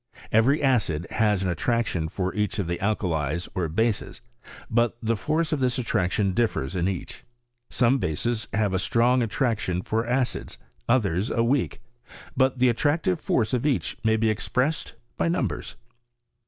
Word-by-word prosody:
Every 130 +8 +3
acid 100 - +2
has 105 -3 +2
an 95 - 0
attraction 90 -2 0
for 95 +2 -2
each 105 +1 -1
of 100 - -1
the 85 +1 -3
alkalies 85 -6 -1
or 90 -3 -1
bases; 110 +6 -1 0.5
but 120 0 +1
the 115 0 0
force 155 +8 -1
of 155 - 0
this 125 -2 +1
attraction 100 -4 0
differs 95 - 0
in 90 0 +1
each. 95 -3 -5 0.5
Some 130 +2 +3
bases 110 +7 -1
have 105 -3 +1
a 95 - +1
strong 120 +6 +3
attraction 110 -6 -1
for 110 +1 -1
acids, 125 0 -1 0.3
and 115 - +6
others 95 -3 -1
a 115 - +1
weak; 120 -1 0 0.5
but 130 0 +2
the 125 0 +4
attractive 160 +8 +1
force 115 -5 0
of 125 - +1
each 145 -3 0
may 110 0 +3
be 110 0 +2
expressed 125 +9 -1 0.2
by - - +1
xiumbers. 110 - -2
110 Hz, 160 wpm, -25 LUFS, 95-125 Hz, 0.5 s, and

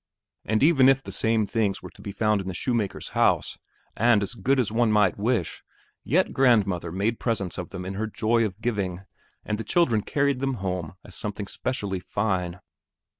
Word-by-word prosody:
And 110 +3 +1
even 140 -4 +6
if 135 0 +3
the - - -7
same 110 -2 +1
things 100 -1 -1
were - - -9
to - - -16
be 100 - -6
found 105 0 +1
in 95 - -8
the 95 - -4
shoemaker's 115 0 -2
house - - +1 0.4
and 115 -2 +4
as 100 - -4
good 130 +5 +1
as 115 -5 0
one 115 0 +2
might 105 -4 +3
wish, 110 -5 -1 0.4
yet 170 - +1
grandmother 100 - +2
made 105 +6 -1
presents 100 -7 -2
of 90 - -5
them 90 -2 -7
in 95 - -4
her 110 +3 -2
joy 115 +2 +1
of 105 -2 -3
giving, 100 -6 -2 0.4
and 105 - -2
the - - -3
children 120 -11 +2
carried 140 +3 0
them 135 0 -1
home 90 -5 -4
as - - -12
something 105 -1 -5
especially 100 -4 -3
fine. 90 -2 -2
105 Hz, 190 wpm, -25 LUFS, 95-120 Hz, 0.4 s, even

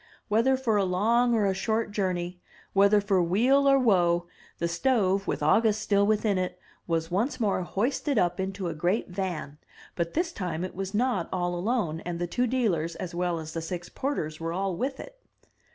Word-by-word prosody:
Whether 230 +5 +3
for 235 -5 +1
a 200 - +3
long 230 +6 +2
or 215 -2 +2
a 195 - +2
short 220 +3 -1
journey, 180 -3 -2 0.3
whether 200 +1 +5
for 195 -2 +2
weal 250 +11 +3
or 275 - +6
woe, 175 -8 +3 0.3
the 170 - -1
stove 195 0 +1
with - - -2
August 215 +7 +3
still 200 -1 +2
within 210 -2 +2
it, 180 0 -3 0.3
was 165 0 -1
once 240 +8 0
more 205 -5 +1
hoisted 250 - -1
up 175 -1 +1
into 190 -1 -3
a 165 - -2
great 175 +8 0
van; 175 -6 -4 0.4
but 170 -1 -2
this 340 0 0
time 180 - -3
it 185 - -5
was 195 +2 -4
not 220 -6 0
all 175 -1 -1
alone, 175 -3 -1
and 175 0 -5
the 175 - -1
two 245 +8 0
dealers 185 -10 0
as 185 -2 -6
well 175 -1 -1
as 160 0 -7
the 165 - -3
six 175 +1 -5
porters 160 - -3
were 165 0 -3
all 190 0 -1
with 265 +8 -3
it. - - -10
195 Hz, 195 wpm, -27 LUFS, 175-225 Hz, 0.4 s, or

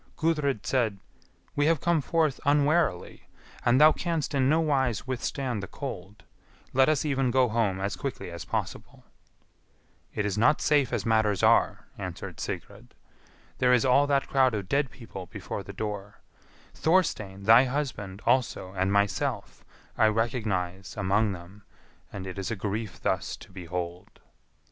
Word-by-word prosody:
Gudrid 150 -8 0
said, 115 -6 +1 0.6
"We 145 +1 +2
have 165 -2 +3
come 170 0 +2
forth 155 -2 +1
unwarily, 145 - +1 0.4
and 120 +2 +4
thou 155 +1 +8
canst 165 -2 -2
in 135 -1 +2
no 160 +2 +4
wise 135 -9 +1
withstand 130 -2 -3
the 95 - -6
cold; 95 +5 -7 0.5
let 130 +3 +5
us 155 -1 +1
even 135 -3 +1
go 130 0 +3
home 105 -4 0
as 100 +2 -2
quickly 135 -9 -5
as 85 -3 -7
possible." - - -5 1.1
"It 105 - -1
is 105 0 -1
not 145 +7 +4
safe 145 -3 +2
as 120 -5 -2
matters 110 -3 +2
are," - - +3
answered - - -6
Sigrid. - - -7 0.6
"There 125 0 +4
is 125 +1 +3
all 140 +3 +4
that 140 -1 +1
crowd 130 -4 +3
of 100 -3 -4
dead 140 +2 +1
people 105 -7 -10
before - - -6
the - - -9
door; 105 -1 -6 0.5
Thorstein, 110 - 0
thy 115 +5 +7
husband, 125 -8 -4
also, 115 -7 +1
and 95 0 0
myself, 100 0 -1 0.4
I 110 - +6
recognise 105 -5 -2
among 100 +1 +1
them, 95 +3 -11 0.5
and 95 -2 -6
it 95 +1 -6
is 95 - -3
a 115 - -2
grief 105 +2 -4
thus - - -1
to - - -15
behold." 90 -1 -6
115 Hz, 155 wpm, -27 LUFS, 100-140 Hz, 1.1 s, thou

